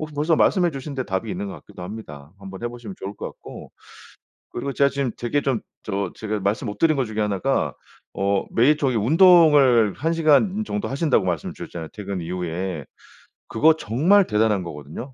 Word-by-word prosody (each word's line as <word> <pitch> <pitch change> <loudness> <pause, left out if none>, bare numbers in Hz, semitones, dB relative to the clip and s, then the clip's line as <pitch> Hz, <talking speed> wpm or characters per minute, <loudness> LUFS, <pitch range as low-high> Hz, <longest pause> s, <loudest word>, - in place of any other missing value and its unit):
혹시 155 -1 -6
벌써 155 +3 +2
말씀해 175 0 +3
주신 140 +1 -6
데 130 -1 -3
답이 95 -3 -3
있는 190 +2 -4
것 195 - -6
같기도 105 - -12
합니다. 85 -7 -9
한번 95 0 -9
해 120 - -1
보시면 120 -4 -9
좋을 100 +2 -6
것 - - -5
같고. - - -11 0.8
그리고 140 +3 -4
제가 140 +1 +3
지금 140 -3 -2
되게 120 +4 0
좀 130 -5 0 0.2
저 100 -3 -2
제가 110 -1 -3
말씀 100 +5 -1
못 105 - -5
드린 155 -3 +3
것 135 - +1
중에 110 0 -4
1 105 -2 0
가 135 0 0 0.4
어 100 0 0
매일 135 +6 +4
저기 130 -5 0
운동을 145 - +5
1 160 +4 -1
시간 165 +7 +3
정도 210 -1 -3
하신다고 140 - +1
말씀을 85 -4 -2
주셨잖아요 80 -2 -7
퇴근 100 -3 -5
이후에. 90 -2 -4 0.6
그거 155 +8 +4
정말 170 - +3
대단한 105 -3 +1
거거든요. 80 - -8
120 Hz, 375 characters per minute, -23 LUFS, 100-150 Hz, 0.8 s, 운동을